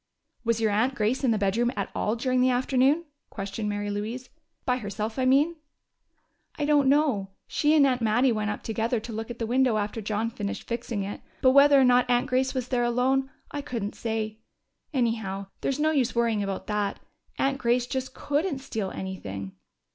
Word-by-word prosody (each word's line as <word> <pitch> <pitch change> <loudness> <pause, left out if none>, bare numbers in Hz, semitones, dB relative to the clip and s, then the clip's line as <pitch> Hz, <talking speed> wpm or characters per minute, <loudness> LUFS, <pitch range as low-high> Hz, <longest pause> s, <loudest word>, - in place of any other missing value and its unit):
"Was 230 -1 +1
your 220 -2 +2
aunt 240 +6 +1
Grace 230 +4 0
in 260 - +3
the 225 - +3
bedroom 210 +4 +1
at 200 - -3
all 215 - 0
during 255 +1 +1
the 255 - +4
afternoon?" 260 +5 +2 0.2
questioned 200 +1 -4
Mary 205 0 -2
Louise. 220 +5 -4 0.4
"By 250 0 +2
herself, 215 +1 -4
I 260 - +2
mean?" 290 +6 +3 1.0
"I 295 - 0
don't 290 -2 +4
know. 275 -10 +2 0.2
She 300 +1 +2
and 290 -2 +6
Aunt 255 -2 +1
Mattie 235 +4 +3
went 215 -2 -1
up 210 - -4
together 225 +1 -1
to 225 +1 -8
look 225 +1 -5
at 240 - -6
the 230 - -2
window 250 -1 +2
after 210 +2 -2
John 215 +2 -1
finished 205 -4 -5
fixing 235 -3 -3
it, 200 +1 -6 0.2
but 260 - +7
whether 280 +1 +7
or - - +6
not 250 0 +4
Aunt 245 0 +3
Grace 260 +1 0
was 255 -1 -2
there 245 -2 +1
alone, 260 +3 +1 0.2
I 290 - -3
couldn't 230 -7 -4
say. 220 -1 -3 0.5
Anyhow, 220 -7 -1 0.2
there's 275 +1 -1
no 310 +1 +3
use 260 -6 +1
worrying 230 -3 +2
about 195 -1 -3
that. 210 -1 -1 0.4
Aunt 270 0 +1
Grace 240 +1 +2
just 260 +1 -4
couldn't 295 +2 -1
steal 225 -7 -4
anything." 100 - -6
240 Hz, 195 wpm, -27 LUFS, 215-260 Hz, 1.0 s, but